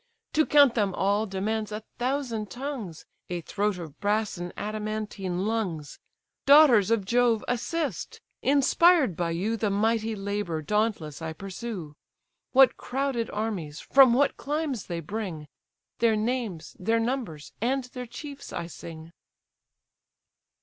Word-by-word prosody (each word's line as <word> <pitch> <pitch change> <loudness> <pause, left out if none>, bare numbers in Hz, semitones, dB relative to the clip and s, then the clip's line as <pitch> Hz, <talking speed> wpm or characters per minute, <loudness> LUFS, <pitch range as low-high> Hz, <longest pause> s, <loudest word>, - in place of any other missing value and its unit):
To 310 0 +3
count 285 -4 +6
them 205 -5 0
all, 205 +3 +1
demands 215 +3 -2
a 210 +1 -5 0.2
thousand 245 -5 -1
tongues, 245 - -6 0.2
A 175 -1 -3
throat 205 +3 -1
of 160 -4 -9
brass, 210 +1 0
and 175 0 -5
adamantine 210 -3 -3
lungs. 190 -10 -2 0.5
Daughters 275 -9 +7
of 230 -4 +1
Jove, 235 0 +2
assist! 270 - -2 0.2
inspired 285 - +4
by 170 +1 -1
you 190 +7 -1
The 215 -1 0
mighty 220 +2 +1
labour 200 -5 -3
dauntless 210 -6 -1
I 160 0 -4
pursue; 195 -2 -6 0.6
What 270 0 +6
crowded 260 -3 -2
armies, 200 -9 -3
from 270 -2 +6
what 285 +2 +2
climes 290 -6 -2
they 170 -1 -3
bring, 170 -4 -5 0.5
Their 230 -1 +4
names, 215 -6 -2
their 225 +5 +1
numbers, 225 - -3
and 260 +3 +1
their 250 0 -8
chiefs 280 +3 -9
I - - -4
sing. 165 -1 -10
215 Hz, 130 wpm, -27 LUFS, 185-245 Hz, 0.6 s, Daughters